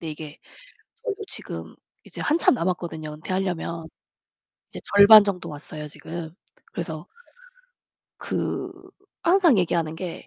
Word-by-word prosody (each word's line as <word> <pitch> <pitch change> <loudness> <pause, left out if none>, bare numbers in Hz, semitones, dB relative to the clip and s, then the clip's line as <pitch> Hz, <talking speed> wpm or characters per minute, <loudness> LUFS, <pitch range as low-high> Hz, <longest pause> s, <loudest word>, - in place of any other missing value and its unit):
근데 160 -2 -5
이게 150 0 -9 0.7
저희도 430 -3 -3
지금 - - -7 0.3
이제 - - -11
한참 310 0 +4
남았거든요 165 -5 -3
은퇴하려면. 170 -1 -3 0.8
이제 - - -8 0.2
절반 205 +1 +10
정도 180 -4 -3
왔어요 150 +1 -8
지금. 160 +2 -7 0.4
그래서 165 0 -5 1.1
그 - - -3 0.5
항상 345 - +5
얘기하는 165 -3 0
게 175 +1 -6
170 Hz, 265 characters per minute, -24 LUFS, 160-200 Hz, 1.1 s, 절반